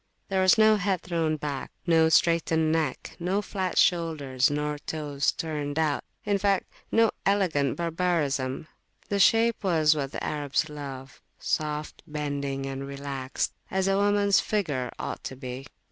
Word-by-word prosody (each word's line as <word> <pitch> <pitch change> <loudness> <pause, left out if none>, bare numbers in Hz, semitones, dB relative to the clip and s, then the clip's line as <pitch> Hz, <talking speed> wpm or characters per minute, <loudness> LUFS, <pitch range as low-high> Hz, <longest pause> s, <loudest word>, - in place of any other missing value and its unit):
There 190 -1 +1
was 185 +2 +5
no 215 0 +6
head 195 -2 0
thrown 165 -3 0
back, 145 -3 -4 0.2
no 165 -2 +4
straightened 160 -1 +3
neck, 160 -1 -2
no 185 +4 0
flat 190 -3 -3
shoulders, 150 -7 +2
nor 150 0 -2
toes 145 -2 -1
turned 150 -3 -4
outin 160 +6 -1
fact, 195 -1 +2 0.3
no 225 -1 +4
elegant 175 -9 +1
barbarisms: 165 -5 -1 0.4
the 200 - 0
shape 225 +2 +4
was 160 -5 +4
what 140 -2 -3
the - - -5
Arabs 150 +1 -1
love, 135 -3 -8 0.2
soft, 150 0 -2
bending, 140 -3 -3
and 135 0 -5
relaxed, 140 -1 -3 0.2
as 190 0 0
a 195 - +3
womans 200 0 +3
[p.198] - - -10
figure 145 - -1
ought - - -5
to 130 - -5
be. 130 +1 -7
155 Hz, 145 wpm, -27 LUFS, 140-185 Hz, 0.4 s, no